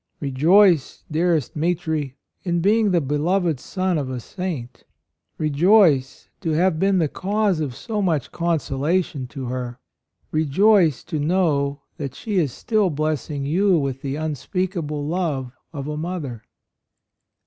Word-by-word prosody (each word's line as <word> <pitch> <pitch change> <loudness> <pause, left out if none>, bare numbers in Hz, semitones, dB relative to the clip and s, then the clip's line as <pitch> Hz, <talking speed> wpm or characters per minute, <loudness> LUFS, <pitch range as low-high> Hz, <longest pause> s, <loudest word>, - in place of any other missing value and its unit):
Rejoice, 155 +4 +3
dearest 160 -3 +1
Mitri, 160 -4 -1 0.3
in 175 -2 0
being 210 +4 +3
the 180 -2 +3
beloved 160 +2 0
son 185 0 -1
of 135 -3 -3
a 130 -1 -3
saint; 150 - -6 0.5
rejoice 155 -2 +3
to 160 - -1
have 170 0 +2
been 195 +1 +3
the 165 -4 +2
cause 200 +2 0
of 140 -5 -3
so 215 -3 -3
much 165 -8 0
consolation 160 -3 -1
to 135 0 -7
her; 125 -1 -4 0.5
rejoice 160 - +3
to 160 -3 -4
know 145 -4 +1 0.2
that 140 -3 -5
she 210 -3 -3
is 155 -7 +2
still 215 - +1
blessing 150 -2 -2
you 185 +5 +3
with 135 -3 -2
the 135 0 -3
unspeakable 155 0 -3
love 150 -6 -2 0.2
of 145 -3 -6
a 150 - -3
mother! 150 -9 -5
155 Hz, 135 wpm, -22 LUFS, 140-185 Hz, 0.5 s, Rejoice